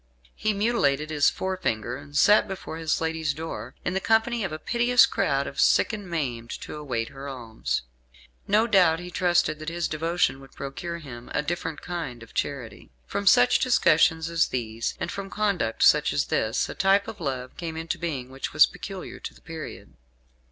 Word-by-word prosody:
He 215 - 0
mutilated 180 - +1
his 150 -2 +4
forefinger, 125 - -2
and 145 +2 -7
sat 210 +4 +6
before 190 -4 -6
his 160 -1 0
lady's 160 -2 -1
door, 130 -7 -6
in 175 - 0
the 190 - +1
company 225 +2 +2
of 190 - -2
a 155 - -4
piteous 240 +7 +4
crowd 140 -10 0
of - - -7
sick - - +4
and 205 -4 -6
maimed, 125 -8 -3
to - - -7
await 125 -7 -3
her 135 +1 -9
alms. 115 - -3 0.6
No 215 +3 +4
doubt 185 -8 +4
he 180 0 -8
trusted 175 -3 +2
that 155 +1 -4
his 170 0 -2
devotion 160 -3 0
would 135 0 -15
procure 170 +5 -5
him 120 -7 -10
a 150 - +1
different 165 0 -4
kind 155 -10 -5
of 115 - -16
charity. 135 -5 -4 0.2
From 200 0 -3
such 245 +3 +6
discussions 160 -9 +3
as 165 0 +2
these, 115 -2 -3
and - - -3
from 200 -1 -5
conduct 195 - 0
such - - +5
as - - +1
this, 110 0 +1
a - - -6
type 195 +1 +3
of 220 - -8
love 130 -1 -4
came 165 -2 -5
into 165 0 -3
being 135 -7 -4
which 135 +1 -5
was - - +8
peculiar - - -8
to - - -8
the - - -19
period. - - -8
160 Hz, 185 wpm, -26 LUFS, 135-190 Hz, 0.6 s, was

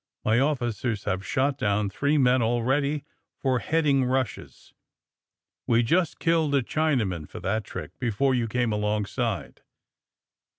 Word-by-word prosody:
My 110 +2 +3
officers 120 -6 -1
have 95 +1 -2
shot 135 +4 0
down 105 -3 +1
three 145 +8 +1
men, 130 -2 +4
already, 135 +6 0 0.3
for 130 -2 +1
heading 145 -2 +2
rushes. 130 -2 -3 0.9
We 120 0 +4
just 170 +8 +1
killed 160 -4 +2
a 135 - +2
Chinaman 115 - -1
for - - -8
that 100 +4 -1
trick - - -7
before 125 +3 +1
you 120 -2 0
came 120 +1 0
alongside." 105 +1 -2
125 Hz, 130 wpm, -26 LUFS, 110-140 Hz, 0.9 s, men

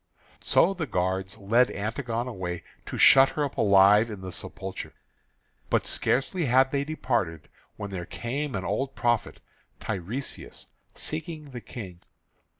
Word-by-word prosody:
So 190 - +3
the 165 -5 -4
guards 95 0 -1
led 115 +5 +3
Antigone 115 +3 -3
away 90 -7 -4 0.2
to - - -4
shut 135 0 +8
her 150 - -1
up 140 - -6
alive 100 +2 +6
in 105 -3 -7
the 95 0 -6
sepulchre. 95 +2 -6 0.8
But - - +2
scarcely 160 +6 0
had 130 +1 +4
they 140 -1 +1
departed 95 - -2 0.3
when 100 -1 -6
there 90 -3 -5
came 135 +3 -3
an 95 - -3
old 135 +6 -2
prophet 120 -2 0 0.4
Tiresias, 110 +7 -5 0.3
seeking 160 0 -5
the 130 -4 -8
King. 95 -5 -9
115 Hz, 140 wpm, -27 LUFS, 95-135 Hz, 0.8 s, shut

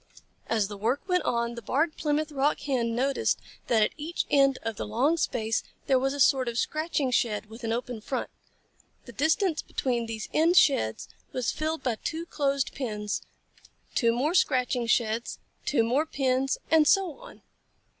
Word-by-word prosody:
As 220 -3 +1
the 205 0 -8
work 245 - -1
went 360 -1 +2
on, 235 0 0
the 235 - -7
Barred 305 +8 0
Plymouth 305 0 -1
Rock 285 +1 +1
Hen 240 -5 -1
noticed 270 +3 +1 0.3
that 225 -3 +4
at - - +1
each 325 +3 -3
end 275 -2 +4
of 225 -1 -3
the - - -5
long 255 +10 +2
space 225 -8 0 0.2
there 265 -2 +3
was 270 +2 0
a - - -6
sort 265 -2 +4
of 235 -1 -3
scratching 305 -2 0
shed 215 -4 +1
with 230 +2 -11
an 225 - -1
open 240 -1 -3
front. 260 +4 -3 0.7
The 240 - -10
distance 315 - +1
between 240 -3 -2
these 220 -1 -5
end 335 +3 +4
sheds 110 - +3 0.3
was 255 -2 0
filled 315 +1 -3
by 240 -4 0
two 325 +1 -3
closed 280 -4 -1
pens, 210 -6 -3 0.7
two 235 -3 +3
more 265 +8 0
scratching 250 -7 +2
sheds, 230 0 0 0.3
two 240 -5 +2
more 265 +8 +1
pens, 270 -2 0
and 315 -2 +5
so 385 -5 +2
on. - - -14
260 Hz, 175 wpm, -27 LUFS, 230-300 Hz, 0.7 s, and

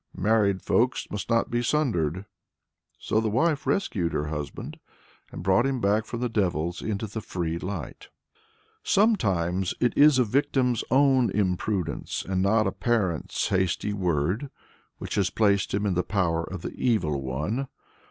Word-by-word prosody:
married 100 -1 +2
folks 125 +2 +1
must 105 +2 -5
not 115 -1 +1
be 120 0 +1
sundered." 100 - 0 0.7
So 110 - 0
the 110 -1 0
wife 145 +7 +1
rescued 95 - 0
her 75 0 -1
husband, 75 -2 -6 0.5
and - - -7
brought 95 +7 +3
him 135 -2 -1
back 105 +1 +1
from 120 -1 -5
the 125 - +1
devils 90 -6 -1
into 110 0 -3
the 110 +1 -6
free 85 -4 -3
light. 100 +3 -6 0.7
Sometimes 95 - +1
it 120 - +1
is 145 -1 +6
a 125 - +5
victim's 125 0 +1
own 130 -1 +4
imprudence, 95 -4 -2
and 95 -1 0
not 110 +3 +3
a 95 - 0
parent's 95 -4 -1
"hasty 95 +2 0
word," 90 - -1 0.5
which - - -6
has 100 -3 +1
placed 100 -1 +1
him 100 +1 -1
in 100 - +1
the 90 - +1
power 90 -5 0
of 95 -1 -7
the - - -5
Evil 80 - 0
One. 75 - -2
100 Hz, 155 wpm, -26 LUFS, 90-120 Hz, 0.7 s, is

